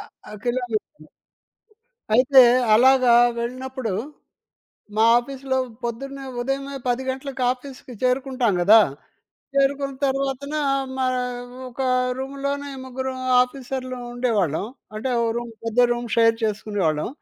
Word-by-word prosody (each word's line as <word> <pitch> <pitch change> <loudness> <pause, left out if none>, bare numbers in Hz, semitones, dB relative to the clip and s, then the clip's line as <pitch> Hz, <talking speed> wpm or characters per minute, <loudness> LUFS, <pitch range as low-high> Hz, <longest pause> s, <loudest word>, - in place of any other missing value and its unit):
ఆ! - - -14
కిలోమీటర్లు. 245 +2 -3 1.1
అయితే 260 +3 +7 0.3
అలాగా 255 +1 +5 0.3
వెళ్ళినప్పుడు, 255 -1 -4 1.0
మా 220 - +3
ఆఫీస్‌లో 265 +1 -3 0.3
పొద్దున్నే 275 +4 -5 0.2
ఉదయమే 275 +2 -3
10 245 +1 0
గంటలకు 265 0 -5
ఆఫీస్‌కి 255 0 -9
చేరుకుంటాం 255 -3 +1
కదా! 210 +5 +8 0.8
చేరుకున్న 275 0 +1
తర్వాతన 275 +1 -1 0.4
మా 260 -1 0 0.6
ఒక 250 +1 -10 0.4
రూమ్‌లోనే 280 +1 -4
ముగ్గురు 260 +1 -4 0.3
ఆఫీసర్‌లం 255 -1 -5
ఉండేవాళ్ళం. 210 - 0 0.3
అంటే 220 +5 -3
ఒక 230 - +1
రూమ్ 240 0 -4
పెద్ద 230 +1 +1
రూమ్ 240 0 -4
షేర్ 230 0 +4
చేసుకునేవాళ్ళం. 200 -7 -1
255 Hz, 100 wpm, -23 LUFS, 235-270 Hz, 1.1 s, కదా